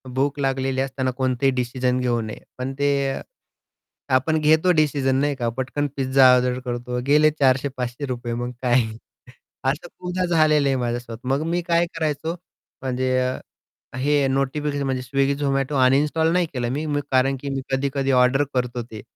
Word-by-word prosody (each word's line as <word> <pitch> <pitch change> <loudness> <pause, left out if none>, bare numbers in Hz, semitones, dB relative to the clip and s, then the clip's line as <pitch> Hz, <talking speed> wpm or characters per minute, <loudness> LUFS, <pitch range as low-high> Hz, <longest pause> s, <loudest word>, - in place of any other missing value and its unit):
भूक 140 +2 0
लागलेली 135 -1 0
असताना 130 -1 -2
कोणतेही 130 +1 +1
डिसिजन 125 0 0
घेऊ 120 -2 0
नये. 110 -1 -7 0.2
पण 130 +1 -4
ते 145 0 +3 0.2
अ, - - -5 0.9
आपण 155 +5 +2
घेतो 160 +4 +4
डिसिजन 145 -4 +2
नाही 145 +1 +1
का, 120 -3 -1
पटकन 140 +3 -1
पिझ्झा 130 -1 +5
ऑर्डर 125 0 +1
करतो, 125 0 -3
गेले 150 +1 +5
₹400-₹500 130 -2 -1
मग 120 +1 -3
काय. 125 -1 +3 0.8
असं 145 +6 -1
खूपदा 180 0 -2
झालेलं 155 -4 +3
आहे 135 - +1
माझ्यासोबत. 120 -2 -3
मग 135 +3 +1
मी 175 +1 0
काय 170 0 +2
करायचो, 160 +1 -2 0.5
म्हणजे 130 0 0
अ, 130 0 -5 0.4
हे 140 +1 +2
नोटिफिकेशन 140 +2 -1
म्हणजे 130 -1 -1
स्विगी, 135 +2 0
झोमॅटो 135 0 -1
अनइन्स्टॉल 150 +5 +3
नाही 180 -1 +2
केलं 120 -2 -2
मी, 150 +4 -2
मी 145 -1 -1
कारण 135 +1 +3
की 140 - -4
मी 135 -1 -2
कधी-कधी 135 0 0
ऑर्डर 125 +2 +4
करतो 125 -1 -1
ते. 110 -2 -10
135 Hz, 160 wpm, -23 LUFS, 125-145 Hz, 0.9 s, पिझ्झा